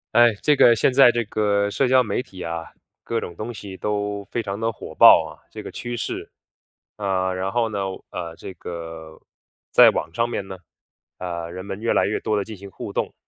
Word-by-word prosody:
哎， 120 -1 +7
这 150 -1 +4
个 120 - +7
现 115 - +3
在 130 -1 +7
这 120 0 +1
个 100 -1 0
社 130 +6 +1
交 130 0 +5
媒 105 0 -1
体 95 -7 -12
啊， 85 -1 -5 0.3
各 115 -1 -2
种 85 - -6
东 110 +7 -6
西 100 -3 -9
都 105 0 -2
非 120 - -3
常 100 -1 -4
地 115 0 0
火 115 - -8
爆 - - +8
啊， - - -13
这 - - -9
个 - - -8
趋 120 0 -5
势。 120 - -4 0.7
呃， 95 -2 0
然 95 +1 -2
后 120 0 +1
呢， 100 -2 -2
我 95 - -8
呃， 85 -1 -6
这 95 - -9
个， 80 -2 -8 0.5
在 - - +8
网 80 +2 -3
上 115 +6 0
面 100 - -3
呢， 95 - -7 0.6
呃， 85 -2 -4
人 95 +2 -7
们 100 0 -6
越 115 - +1
来 - - +3
越 105 - -1
多 110 - -1
地 100 - 0
进 110 +1 -9
行 100 +1 -10
互 - - -7
动， - - -2
100 Hz, 235 characters per minute, -23 LUFS, 95-115 Hz, 0.7 s, 爆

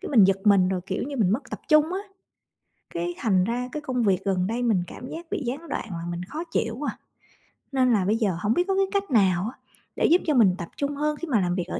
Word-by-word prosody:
cái - - -6
mình 230 -8 +7
giật 195 0 +4
mình 200 -3 +5
rồi, 185 -1 -1
kiểu 190 - -2
như, 280 +1 -5
mình 205 -7 +2
mất 265 +4 -3
tập - - -6
trung 305 +2 +4
á. 380 - -2 0.9
Cái 175 +1 -2
thành 190 -5 +2
ra 245 +5 -2
cái 300 - -4
công 255 -4 -1
việc 190 -4 +2
gần 185 -2 +1
đây 235 +3 -2
mình 215 -7 +2
cảm 250 - -9
giác 335 +2 -7
bị - - -1
gián 280 +8 -4
đoạn - - -3
làm 170 0 -4
mình 175 +1 -4
khó 300 - -5
chịu 225 -7 -1
quá 295 - -1
à. - - -24 0.7
Nên 255 -2 +3
là 200 -4 +2
bây 210 +4 +2
giờ 200 -7 0
hổng 210 +3 +2
biết 355 +1 +1
có 390 - +1
cái 390 0 +3
cách 400 -4 -1
nào 195 -3 +3
á, - - -26 0.4
để - - +1
giúp 345 +3 +5
cho 305 - +3
mình 210 -9 +5
tập 170 -4 -5
trung 285 0 -2
hơn 300 +1 -1
khi 340 - -6
mà 245 -8 +2
làm 175 -1 0
việc 180 -2 -2
ở - - -4
230 Hz, 280 wpm, -25 LUFS, 185-290 Hz, 0.9 s, mình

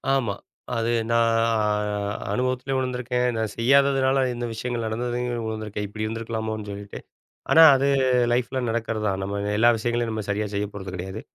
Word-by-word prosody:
ஆமா. 120 -7 0 0.4
அது 115 0 0 0.2
நான் 115 0 +3 1.0
அனுபவத்திலேயும் 130 +1 -1
விழுந்திருக்கேன். 125 -1 -1
நான் 110 -2 -2
செய்யாததுனால 135 +1 +3
இந்த 120 0 -4
விஷயங்கள் 120 0 -3
நடந்ததுலேயும் 120 +1 -2
விழுந்திருக்கேன், 105 -1 -4
இப்படி 105 +2 -4
இருந்துருக்கலாமோன்னு 110 -1 -4
சொல்லிட்டு. 100 0 -8 0.5
ஆனா 165 - +8
அது 135 +1 +1 0.5
லைஃப்ல 125 +2 -1
நடக்கிறதுதான். 110 -4 -1
நம்ம 100 +1 -3 0.2
எல்லா 120 +2 +6
விஷயங்களையும் 120 0 -1
நம்ம 110 -2 -4
சரியா 105 +1 -1
செய்யப்போறது 100 -2 -4
கிடையாது. 95 +4 -6
115 Hz, 130 wpm, -24 LUFS, 105-125 Hz, 1.0 s, ஆனா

